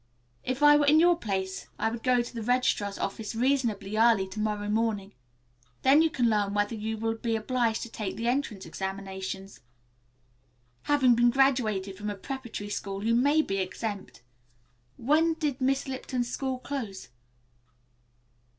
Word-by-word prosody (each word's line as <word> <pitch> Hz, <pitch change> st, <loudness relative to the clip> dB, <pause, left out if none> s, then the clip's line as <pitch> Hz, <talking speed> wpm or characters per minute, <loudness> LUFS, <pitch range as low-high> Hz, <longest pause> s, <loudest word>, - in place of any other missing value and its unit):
"If 260 Hz, +3 st, -2 dB
I 295 Hz, 0 st, +8 dB
were 290 Hz, -1 st, +2 dB
in 305 Hz, +2 st, +6 dB
your 350 Hz, +1 st, +5 dB
place 190 Hz, -, -3 dB
I -, -, 0 dB
would 230 Hz, 0 st, -5 dB
go 250 Hz, -1 st, +3 dB
to 240 Hz, -, -10 dB
the 230 Hz, -, -5 dB
registrar's 220 Hz, -4 st, 0 dB
office 215 Hz, +3 st, -4 dB
reasonably 225 Hz, -5 st, 0 dB
early 225 Hz, -4 st, +4 dB
to 190 Hz, -, -7 dB
morrow 210 Hz, -1 st, -1 dB
morning. 210 Hz, -2 st, 0 dB, 0.8 s
You 300 Hz, +5 st, +6 dB
can 250 Hz, -6 st, +1 dB
then 215 Hz, -1 st, +3 dB
learn 200 Hz, 0 st, -3 dB
whether 205 Hz, +2 st, +1 dB
you 220 Hz, 0 st, -3 dB
will 225 Hz, +1 st, -1 dB
be 225 Hz, 0 st, -2 dB
obliged 230 Hz, 0 st, 0 dB
to 235 Hz, -, -7 dB
take 210 Hz, -4 st, -4 dB
the 230 Hz, +1 st, -3 dB
entrance 240 Hz, -6 st, -1 dB
examinations. 190 Hz, 0 st, -6 dB, 1.3 s
Having 270 Hz, -4 st, +5 dB
been 240 Hz, +1 st, +4 dB
graduated 230 Hz, -8 st, +1 dB
from 210 Hz, +1 st, -4 dB
a 205 Hz, -, -3 dB
preparatory 235 Hz, -2 st, -6 dB
school 195 Hz, 0 st, -4 dB
you 230 Hz, -, +2 dB
may 285 Hz, +6 st, +4 dB
be 195 Hz, -, -2 dB
exempt. 195 Hz, -, -5 dB, 0.7 s
When 315 Hz, +6 st, +2 dB
did 295 Hz, -4 st, -2 dB
Miss 270 Hz, +1 st, +1 dB
Lipton's 255 Hz, -2 st, -3 dB
school 265 Hz, -1 st, -2 dB
close?" 240 Hz, -, -6 dB
230 Hz, 160 wpm, -28 LUFS, 205-260 Hz, 1.3 s, I